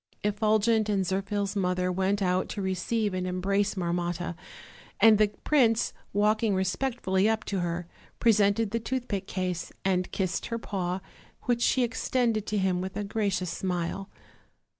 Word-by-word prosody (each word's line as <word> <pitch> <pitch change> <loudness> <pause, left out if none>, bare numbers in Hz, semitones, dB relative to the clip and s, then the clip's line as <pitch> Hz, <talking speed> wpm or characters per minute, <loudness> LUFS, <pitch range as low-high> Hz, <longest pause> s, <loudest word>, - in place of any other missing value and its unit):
Effulgent 215 +1 +2
and 195 -2 +1
Zirphil's 195 +2 -1
mother 180 -1 +1
went 190 +2 +1
out 185 0 +1
to 205 - -4
receive 195 +3 -1
and 185 0 -2
embrace 195 +3 0
Marmotta, 175 -1 -2 0.7
and 220 -2 +7
the 215 - +5 0.2
prince, 235 -7 +3 0.2
walking 210 +1 +2
respectfully 190 +1 +1
up 220 -1 0
to 195 - -2
her, 175 0 -2 0.3
presented 215 -1 +3
the 230 - 0
toothpick 235 -4 -3
case 180 -2 -3
and 185 -1 +1
kissed 185 -2 -1
her 230 - -2
paw, 185 -4 -3 0.4
which 240 -2 +1
she 255 +1 +3
extended 230 -2 0
to 210 - -1
him 190 -2 +1
with 190 +1 -5
a 210 - -1
gracious 200 -4 -1
smile. 180 +2 -3
200 Hz, 145 wpm, -28 LUFS, 185-220 Hz, 0.7 s, and